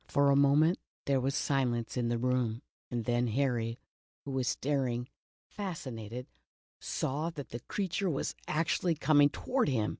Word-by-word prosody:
For 140 0 +4
a - - +5
moment 145 +5 +5 0.3
there 140 -1 +2
was 135 +2 0
silence 120 -5 0
in 125 -2 0
the 120 - +1
room 125 0 0 0.3
and 120 -2 -2
then 120 0 +2
Harry, 120 -1 0 0.5
who 140 - -4
was 130 -2 0
staring, 125 -2 0 0.4
fascinated, 125 - -5 0.5
saw 150 +5 -1
that 145 -6 -7
the 120 - -5
creature 195 - -1
was 140 - -1
actually 165 +2 +1
coming 145 -1 +5
toward 250 - 0
him 110 -5 +1
135 Hz, 150 wpm, -32 LUFS, 120-150 Hz, 0.5 s, a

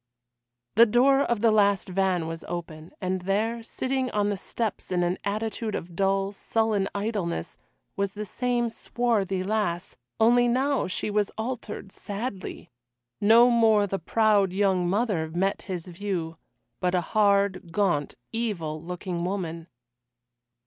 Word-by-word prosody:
The 230 +2 +7
door 260 +5 +4
of 235 -6 0
the 225 -1 +5
last 200 -2 +3
van 185 -2 +1
was 165 0 -5
open, 165 -2 -6
and 185 0 -2
there, 215 +5 0
sitting 260 +3 -2
on 205 -2 +1
the - - 0
steps 210 +2 -4
in 180 -1 +2
an 175 +1 0
attitude 215 +2 -2
of 170 0 -6
dull 195 +1 +1
sullen 215 -1 0
idleness, 200 - -3 0.4
was 200 -1 -1
the 210 0 -5
same 240 +2 -1
swarthy 215 -6 0
lass, 185 -4 -1 0.2
only 240 +2 +5
now 265 +3 +1
she 185 +3 -2
was 205 -1 +1
altered 220 -3 -5
sadly! 200 - -6 0.5
No 230 +4 +7
more 220 -3 +4
the 195 -1 -3
proud 205 +1 +3
young 190 -3 +2
mother 195 -6 0
met 190 +4 0
his 180 -3 -3
view, 180 -3 -4 0.4
but 180 0 +1
a 180 - +2
hard, 200 -2 +2
gaunt, 170 -7 0 0.2
evil 175 -10 -2
looking 175 0 -4
woman. 170 -3 -3
200 Hz, 140 wpm, -26 LUFS, 180-225 Hz, 0.5 s, The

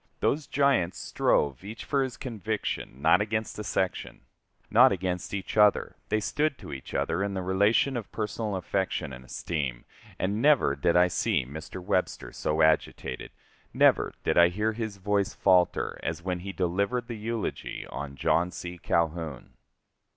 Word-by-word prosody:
Those 150 -1 0
giants 135 -11 +2
strove 70 +1 +1
each 110 +3 -8
for 140 - +1
his 130 -2 -3
conviction, 110 - -4
not 80 +5 +5
against 110 0 -2
a - - -3
section 95 -1 -2 0.5
not 125 +4 +7
against 90 -1 -2
each 100 +1 -4
other; 105 -1 +4
they 110 - +2
stood 150 +7 0
to - - -9
each 65 - -8
other 85 - 0
in 100 0 -1
the 95 - -2
relation 100 +8 +3
of 115 -4 -5
personal 105 -1 -3
affection 90 -5 -2
and 65 0 -9
esteem, 65 -1 -4 0.3
and 100 +4 -1
never 145 -1 +4
did 85 -1 +1
I 90 +1 +6
see 85 - 0
Mr. 80 +7 -8
Webster 90 0 -1
so 80 +1 0
agitated, 80 -4 0 0.5
never - - +4
did - - +3
I 85 - +8
hear 105 +5 -1
his 110 -2 -4
voice 100 0 0
falter, 90 -3 +2
as - - -4
when 90 -1 -2
he 95 +2 -6
delivered 100 +7 0
the 120 - -5
eulogy 110 +1 -4
on 70 -1 -6
John 85 +5 +2
C. 90 0 -7
Calhoun. 80 -5 -1
95 Hz, 160 wpm, -28 LUFS, 85-110 Hz, 0.5 s, I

